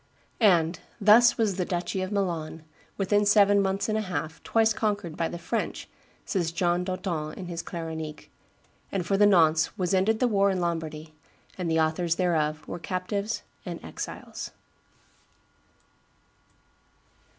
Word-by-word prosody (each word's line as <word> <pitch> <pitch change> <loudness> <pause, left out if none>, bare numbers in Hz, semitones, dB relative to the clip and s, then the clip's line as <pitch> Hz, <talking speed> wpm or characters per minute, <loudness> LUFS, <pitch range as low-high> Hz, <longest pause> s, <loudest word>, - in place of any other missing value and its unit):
And 175 -6 +4 0.2
"thus 220 +4 +6
was 210 -5 +1
the 185 - +1
duchy 180 +1 -2
of 185 +1 -3
Milan, 170 -6 -2 0.3
within 205 +1 +2
seven 205 -1 +5
months 195 +1 0
and 215 - 0
a 220 - +1
half, 170 -5 -4
twice 225 -1 +2
conquered 205 -6 -2
by 165 - 0
the 175 - -6
French," 175 +7 -3 0.4
says 175 -5 -1
John 175 +1 +1
d'Auton 180 -5 -3
in 185 - -6
his 170 -1 -4
Claronique, 160 -2 -6 0.6
"and 190 -3 -2
for 195 - +1
the 205 +1 +6
nonce 160 -5 +4
was 180 0 0
ended 205 +4 +2
the 250 - +3
war 200 -3 +3
in 190 -1 0
Lombardy, 160 -2 -3 0.4
and 180 -3 -3
the 160 0 +2
authors 160 +2 +1
thereof 155 -4 0
were 175 - -5
captives 200 +4 -3 0.2
and - - -6
exiles." - - -6
180 Hz, 145 wpm, -27 LUFS, 165-200 Hz, 0.6 s, thus